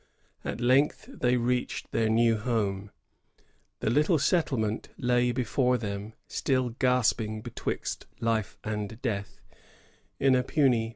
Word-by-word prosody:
At -, -, -4 dB
length 130 Hz, -, +3 dB
they 125 Hz, -, +2 dB
reached 125 Hz, +1 st, -1 dB
their 110 Hz, -1 st, +1 dB
new 115 Hz, +1 st, +4 dB
home. 105 Hz, -3 st, -1 dB, 0.9 s
The 110 Hz, -, +1 dB
little 150 Hz, +6 st, +3 dB
settlement 135 Hz, -, 0 dB
lay 125 Hz, 0 st, +2 dB
before 125 Hz, +1 st, +1 dB
them, 105 Hz, -1 st, -5 dB
still 130 Hz, -2 st, 0 dB
gasping 115 Hz, -3 st, +1 dB
betwixt -, -, -4 dB
life 115 Hz, -3 st, -1 dB
and 105 Hz, 0 st, -4 dB
death, 100 Hz, -5 st, -3 dB, 0.8 s
in 135 Hz, -1 st, +4 dB
a 130 Hz, -, +4 dB
puny, -, -, -9 dB
precarious 140 Hz, -6 st, +4 dB
infancy. -, -, -6 dB
120 Hz, 130 wpm, -28 LUFS, 110-125 Hz, 0.9 s, new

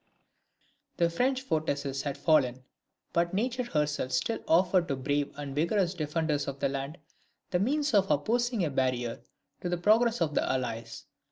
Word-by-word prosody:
The 170 Hz, -1 st, +2 dB
French 260 Hz, +8 st, +1 dB
fortresses 145 Hz, -, -1 dB
had 140 Hz, -1 st, -3 dB
fallen; 130 Hz, -6 st, +2 dB, 0.5 s
but 170 Hz, +2 st, +1 dB
nature 245 Hz, +4 st, 0 dB
herself 150 Hz, -, -1 dB
still 125 Hz, -3 st, 0 dB
offered 180 Hz, +1 st, +3 dB
to 140 Hz, -, -1 dB
brave 145 Hz, +2 st, -1 dB
and 145 Hz, -1 st, -6 dB
vigorous 170 Hz, +5 st, +1 dB
defenders 155 Hz, -3 st, -1 dB
of 140 Hz, 0 st, -5 dB
the -, -, +1 dB
land, 140 Hz, +4 st, -4 dB, 0.5 s
the 180 Hz, -, +2 dB
means 285 Hz, +7 st, +1 dB
of 195 Hz, -2 st, +4 dB
opposing 230 Hz, -, +1 dB
a 150 Hz, -, -2 dB
barrier 130 Hz, -3 st, -1 dB, 0.4 s
to 175 Hz, -, -2 dB
the 175 Hz, -, 0 dB
progress 225 Hz, +6 st, +3 dB
of 160 Hz, -3 st, 0 dB
the -, -, +2 dB
Allies. 115 Hz, -3 st, -3 dB
160 Hz, 160 wpm, -29 LUFS, 140-195 Hz, 0.5 s, of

